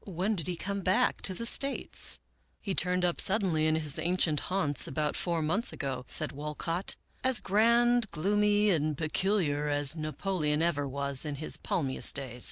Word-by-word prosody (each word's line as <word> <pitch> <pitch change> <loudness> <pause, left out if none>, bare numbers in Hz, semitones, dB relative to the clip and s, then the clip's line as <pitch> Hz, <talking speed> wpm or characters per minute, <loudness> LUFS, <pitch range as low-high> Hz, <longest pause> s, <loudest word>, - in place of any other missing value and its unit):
When 190 +3 -2
did 170 -7 +2
he 180 - -2
come 200 +3 -4
back 185 0 +1
to 190 - -1
the 230 - -5
States? 275 +3 +1 0.2
" - - -42
" - - -43
He 200 - -4
turned 180 0 +2
up 175 - +2
suddenly 185 -6 +1
in 155 - +1
his 155 -2 +2
ancient 165 -2 +1
haunts 170 -8 +1
about 150 +2 -2
four 170 -3 -1
months 195 +10 +1
ago," 130 -2 -5
said - - 0
Walcott, 150 +5 -4
" - - -36
as 260 -2 +3
grand, 235 +3 +2
gloomy, 205 +4 +1
and 155 -3 -1
peculiar 155 -2 -1
as 145 +1 +3
Napoleon 155 -1 -2
ever 145 -4 -1
was 140 0 0
in 150 -2 -4
his 155 +2 +2
palmiest 135 -6 0
days. 130 -3 -5
170 Hz, 180 wpm, -29 LUFS, 150-195 Hz, 0.2 s, as